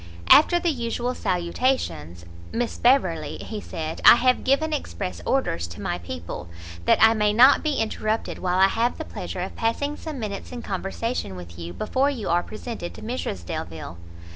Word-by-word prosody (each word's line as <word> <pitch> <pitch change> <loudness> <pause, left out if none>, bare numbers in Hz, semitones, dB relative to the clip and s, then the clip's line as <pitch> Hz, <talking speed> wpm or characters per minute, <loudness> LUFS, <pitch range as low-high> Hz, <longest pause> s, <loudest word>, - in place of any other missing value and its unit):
After 345 +3 +7
the 345 -1 +1
usual 240 -1 -2
salutations, 170 - -1 0.3
"Miss 240 0 -2
Beverley," 175 - +2
he 215 -2 -6
said, 160 0 -5
"I - - +10
have 250 +1 +2
given 310 +4 +2
express 200 -10 -4
orders 85 - 0
to 85 - -10
my - - -2
people, 85 0 -7 0.4
that - - +5
I 225 0 +7
may 210 -2 +2
not 255 +6 +7
be 305 -2 0
interrupted 220 -1 -2
while 180 0 0
I 190 +1 +6
have 230 +5 0
the - - -5
pleasure - - -6
of - - -5
passing 285 +6 -1
some 310 -2 -7
minutes 210 -4 -5
in 245 -1 -7
conversation 195 - -3
with 85 -1 -10
you 85 0 -6
before 260 - 0
you 245 -8 -4
are 175 +1 +3
presented 215 -3 -7
to - - -11
Mrs 215 - -4
Delvile." 80 0 -6
215 Hz, 175 wpm, -24 LUFS, 155-255 Hz, 0.4 s, I